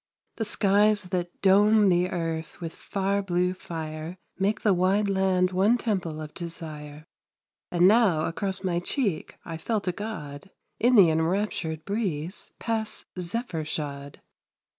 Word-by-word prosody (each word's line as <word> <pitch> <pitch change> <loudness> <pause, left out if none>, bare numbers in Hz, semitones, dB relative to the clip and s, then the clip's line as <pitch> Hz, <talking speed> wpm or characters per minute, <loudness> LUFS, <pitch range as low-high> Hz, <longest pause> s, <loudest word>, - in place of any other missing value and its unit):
The 225 - -1
skies 205 +1 +3
that 180 -1 -4
dome 205 +2 +5
the 180 0 +2
earth 165 -3 -4
with 165 -2 -5
far 200 0 -1
blue 180 -1 0
fire 160 -1 -6 0.2
Make 205 +3 +1
the 210 - +4
wide 190 +3 +2
land 190 -2 +2
one 200 +6 +3
temple 185 -9 -2
of 155 -1 -7
desire; 155 -3 -8 0.7
Just 175 0 +2
now 195 -5 +5
across 190 +3 -3
my 175 -2 0
cheek 200 - -1
I 165 -1 -5
felt 205 +4 -2
a - - +3
God, 175 -6 -7 0.3
In 245 +2 +4
the 185 -7 +7
enraptured 160 -1 -1
breeze, 190 -5 -3
pass 220 -2 -2
zephyr 180 -2 -2
shod. 145 -2 -5
185 Hz, 140 wpm, -26 LUFS, 160-205 Hz, 0.7 s, the